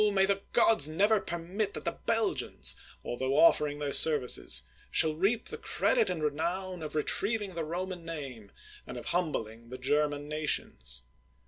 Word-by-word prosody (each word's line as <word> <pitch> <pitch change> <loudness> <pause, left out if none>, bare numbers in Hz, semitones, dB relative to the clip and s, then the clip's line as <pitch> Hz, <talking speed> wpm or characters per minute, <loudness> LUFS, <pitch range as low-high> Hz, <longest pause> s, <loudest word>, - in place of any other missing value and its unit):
may 190 -1 +4
the 200 0 0
gods 225 -10 +5
never 205 +7 +2
permit 185 +4 -4
that - - -7
the - - 0
Belgians, 225 -1 -1 0.3
altho 130 +3 -2
offering 150 -3 +4
their 145 -1 -3
services, 145 -6 +4 0.3
shall 160 -1 +3
reap 195 +9 0
the - - -7
credit 465 -4 +1
and 160 - -3
renown 170 +5 -2
of 155 -1 -6
retrieving 200 +6 0
the 165 -1 -3
Roman 175 +2 -5
name, 135 -11 -8 0.4
and - - -7
of - - -8
humbling 115 -10 -2
the 130 - -7
German 145 +2 0
nations. 65 - -2
160 Hz, 150 wpm, -29 LUFS, 145-190 Hz, 0.4 s, gods